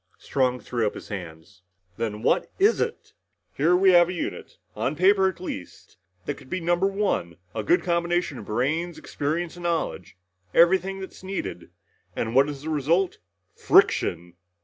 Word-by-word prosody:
Strong 125 Hz, -2 st, 0 dB
threw 120 Hz, -3 st, -1 dB
up -, -, -4 dB
his -, -, -10 dB
hands. 90 Hz, -2 st, -8 dB, 0.3 s
"Then 110 Hz, 0 st, -4 dB
what -, -, +2 dB
is 410 Hz, +4 st, +3 dB
it? 460 Hz, -, -4 dB, 0.4 s
Here 165 Hz, +6 st, +3 dB
we 190 Hz, +1 st, +5 dB
have 175 Hz, -1 st, +6 dB
a -, -, -3 dB
unit, 175 Hz, -, -5 dB, 0.2 s
on 140 Hz, -, -1 dB
paper 190 Hz, +3 st, +4 dB
at 175 Hz, -, -9 dB
least, 100 Hz, -, -8 dB, 0.3 s
that -, -, -3 dB
could 130 Hz, -, -15 dB
be 185 Hz, -, -2 dB
number 175 Hz, +2 st, +1 dB
one. 195 Hz, -, -1 dB, 0.2 s
A 110 Hz, -, -2 dB
good 175 Hz, -, +2 dB
combination 170 Hz, -4 st, 0 dB
of 105 Hz, -, -9 dB
brains, 155 Hz, -, -1 dB
experience 165 Hz, +4 st, -3 dB
and -, -, -9 dB
knowledge. 165 Hz, -, -2 dB, 0.4 s
Everything 190 Hz, +3 st, +4 dB
that's 190 Hz, -, -10 dB
needed. 185 Hz, -, -5 dB, 0.5 s
And 115 Hz, 0 st, -2 dB
what 135 Hz, +3 st, +5 dB
is 145 Hz, -1 st, -7 dB
the 160 Hz, -, -4 dB
result? 165 Hz, +6 st, +1 dB, 0.4 s
Friction!" 85 Hz, 0 st, +3 dB
165 Hz, 165 wpm, -25 LUFS, 115-180 Hz, 0.5 s, have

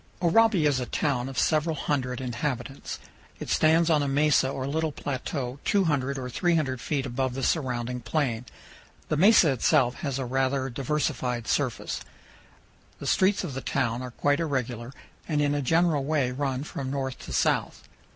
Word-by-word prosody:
Oraibi 195 Hz, -1 st, +4 dB
is 145 Hz, -3 st, +3 dB
a 125 Hz, -, -3 dB
town 135 Hz, -4 st, -1 dB
of 135 Hz, -, -8 dB
several 155 Hz, 0 st, +2 dB
hundred 130 Hz, -4 st, -2 dB
inhabitants. 125 Hz, +1 st, -4 dB, 0.4 s
It -, -, -6 dB
stands 160 Hz, +1 st, +4 dB
on 155 Hz, -3 st, +3 dB
a 145 Hz, -, 0 dB
mesa 140 Hz, -1 st, +3 dB
or 135 Hz, -1 st, -3 dB
little 155 Hz, +3 st, -1 dB
plateau 135 Hz, -1 st, -4 dB
200 145 Hz, -9 st, +1 dB
or 130 Hz, -1 st, -4 dB
300 140 Hz, -3 st, 0 dB
feet 140 Hz, -3 st, -1 dB
above 130 Hz, 0 st, -2 dB
the 135 Hz, -, -3 dB
surrounding 125 Hz, -5 st, -1 dB
plain. 120 Hz, -1 st, -1 dB, 0.6 s
The 155 Hz, -, +1 dB
mesa 190 Hz, -3 st, +6 dB
itself 130 Hz, 0 st, +3 dB
has 140 Hz, -3 st, -2 dB
a 135 Hz, -, -2 dB
rather 135 Hz, +1 st, 0 dB
diversified 125 Hz, -3 st, -2 dB
surface. -, -, -1 dB, 1.0 s
The -, -, -8 dB
streets 195 Hz, +1 st, +2 dB
of 165 Hz, -7 st, -4 dB
the 135 Hz, -, -4 dB
town 125 Hz, -4 st, -1 dB
are 130 Hz, -, -5 dB
quite 145 Hz, +4 st, +1 dB
irregular, 125 Hz, -6 st, -2 dB, 0.4 s
and 150 Hz, -3 st, 0 dB
in 145 Hz, -1 st, +2 dB
a 145 Hz, -, 0 dB
general 160 Hz, 0 st, +2 dB
way 140 Hz, -3 st, +1 dB
run 135 Hz, 0 st, -2 dB
from 140 Hz, -3 st, -5 dB
north 135 Hz, -1 st, -3 dB
to -, -, -9 dB
south. -, -, 0 dB
135 Hz, 165 wpm, -27 LUFS, 125-155 Hz, 1.0 s, mesa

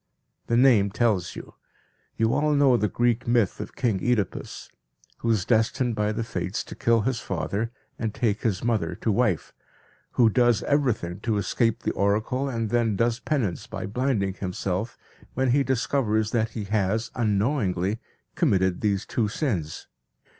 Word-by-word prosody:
The 115 Hz, -, +2 dB
name 120 Hz, -6 st, +5 dB
tells 100 Hz, -4 st, 0 dB
you. -, -, -9 dB, 0.6 s
You 115 Hz, +1 st, +2 dB
all 150 Hz, +2 st, +2 dB
know 140 Hz, -3 st, +5 dB
the 105 Hz, -2 st, +1 dB
Greek 120 Hz, +2 st, 0 dB
myth 115 Hz, -5 st, +2 dB
of -, -, -7 dB
King 105 Hz, -7 st, 0 dB
Oedipus, 120 Hz, -6 st, -2 dB, 0.5 s
who 115 Hz, -, -2 dB
is 105 Hz, -5 st, +2 dB
destined 120 Hz, +1 st, +1 dB
by 105 Hz, -1 st, 0 dB
the 110 Hz, +2 st, -2 dB
fates 95 Hz, -3 st, -3 dB
to -, -, -10 dB
kill 115 Hz, -1 st, +2 dB
his 120 Hz, +1 st, -1 dB
father, 100 Hz, +5 st, -3 dB, 0.3 s
and 110 Hz, -2 st, -1 dB
take 105 Hz, -1 st, -1 dB
his 105 Hz, -6 st, -1 dB
mother 105 Hz, -8 st, 0 dB
to 110 Hz, +3 st, -1 dB
wife, 105 Hz, -6 st, 0 dB, 0.6 s
who 120 Hz, -, +5 dB
does 120 Hz, 0 st, +3 dB
everything 120 Hz, -11 st, 0 dB
to 110 Hz, 0 st, -1 dB
escape 115 Hz, +2 st, 0 dB
the -, -, 0 dB
oracle 110 Hz, +7 st, 0 dB
and 115 Hz, -4 st, -2 dB
then 115 Hz, -3 st, +2 dB
does 115 Hz, +3 st, +1 dB
penance 120 Hz, -, -2 dB
by -, -, -5 dB
blinding 105 Hz, -2 st, 0 dB
himself 95 Hz, +3 st, -3 dB, 0.4 s
when 130 Hz, -1 st, +2 dB
he 140 Hz, +3 st, +4 dB
discovers 115 Hz, -4 st, 0 dB
that 115 Hz, -1 st, +1 dB
he 105 Hz, -, -2 dB
has, 105 Hz, +2 st, 0 dB
unknowingly, 105 Hz, -3 st, 0 dB, 0.3 s
committed 95 Hz, -, +1 dB
these 100 Hz, -3 st, 0 dB
two 115 Hz, -3 st, 0 dB
sins. 105 Hz, -, -3 dB
110 Hz, 160 wpm, -25 LUFS, 100-120 Hz, 0.6 s, name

